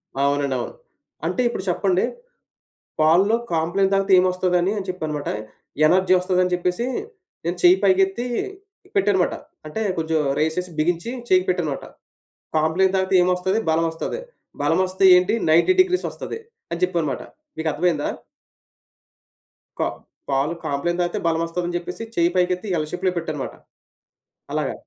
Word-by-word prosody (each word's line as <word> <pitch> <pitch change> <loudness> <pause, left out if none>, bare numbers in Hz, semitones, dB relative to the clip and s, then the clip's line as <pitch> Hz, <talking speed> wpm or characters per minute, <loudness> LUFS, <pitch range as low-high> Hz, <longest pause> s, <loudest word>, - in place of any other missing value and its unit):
ఆ! - - -4
అవునండి. 140 -1 0
అవును. - - -5 0.5
అంటే 255 - 0
ఇప్పుడు 235 -5 -3
చెప్పండి. 185 +1 +1 0.9
పాల్లో 175 +8 +4 0.2
కాంప్లాన్ 175 +4 +1
తాగితే 195 0 +1
ఏమొస్తది? 185 0 +1
అని 185 +3 +1
అని 195 - -3
చెప్పన్నమాట 155 -5 -3 0.6
ఎనర్జీ 185 +3 +3
ఒస్తదని 180 0 +1
చెప్పేసి, 180 +5 0 0.6
నేను 175 +1 -1
చెయ్యి 180 +1 +7
పైకెత్తి 195 +4 +3 0.7
పెట్టా 395 - +3
అన్నమాట. 190 -3 +1 0.3
అంటే 155 +8 -4 0.2
కొంచెం 160 -1 0 0.2
రెయిస్ 160 +2 0
చేసి 180 0 -3
బిగించి 170 +7 0 0.2
చెయ్యికి 185 -2 +3
పెట్టాన్నమాట. 170 -6 -1 0.7
కాంప్లాన్ 160 +5 +2
తాగితే 190 0 0
ఏమొస్తది 180 +3 +1
బలమొస్తది. 165 - -1 0.4
బలం 165 +5 +2
ఒస్తే 185 +1 -1
ఏంటి 180 +4 +2 0.2
90 170 - +5
డిగ్రీస్ 365 0 +2
ఒస్తది - - -6 0.3
అని 170 - -3
జెప్పా 180 -1 +2
అన్నమాట. 150 -4 -2 0.3
మీకు 160 0 -2
అర్థమయిందా? 155 0 0 1.7
కా - - +2 0.4
పాలు 140 +4 +1
కాంప్లాన్ 155 +4 -1
తాగితే 175 - -1
బలమొస్తది 165 +1 -1
అని 175 - -3
జెప్పేసి 180 +5 -4
చెయ్యి 170 0 +3
పైకెత్తి 180 +2 +1
ఎల్ 155 -1 -2
షేప్‌లో 185 +1 0
పెట్టా 165 -2 -2
అన్నమాట. 140 -3 -5 1.0
అలాగా. - - -1
180 Hz, 140 wpm, -22 LUFS, 160-185 Hz, 1.7 s, చెయ్యి